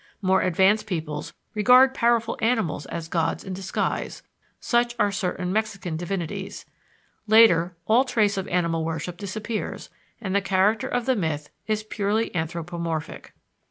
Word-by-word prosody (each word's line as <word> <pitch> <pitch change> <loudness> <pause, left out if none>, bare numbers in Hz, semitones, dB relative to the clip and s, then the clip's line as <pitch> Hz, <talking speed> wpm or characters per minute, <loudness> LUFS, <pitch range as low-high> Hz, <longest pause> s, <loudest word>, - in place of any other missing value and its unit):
More 190 -1 +2
advanced 195 +4 +3
peoples 155 -6 -4 0.2
regard 250 +5 +6
powerful 235 -2 +2
animals 220 -11 0
as 165 -1 -5
gods 165 -1 -1
in 190 - -6
disguise 190 +1 -3 0.4
(such 240 0 +1
are 205 -3 +2
certain 185 -2 -2
Mexican 200 -6 -2
divinities). 190 +3 -4 0.6
Later, 185 -6 +5
all 230 +4 +4
trace 220 -6 +1
of 190 -1 -3
animal 170 -2 0
worship 165 +2 -4
disappears, 210 +3 -5 0.3
and 190 -5 -4
the 200 - +3
character 200 +3 +2
of 245 -1 -1
the 260 - +2
myth 155 -7 -2 0.2
is 215 -1 0
purely 215 +1 -1
anthropomorphic. 165 -1 -4
195 Hz, 135 wpm, -25 LUFS, 170-220 Hz, 0.6 s, regard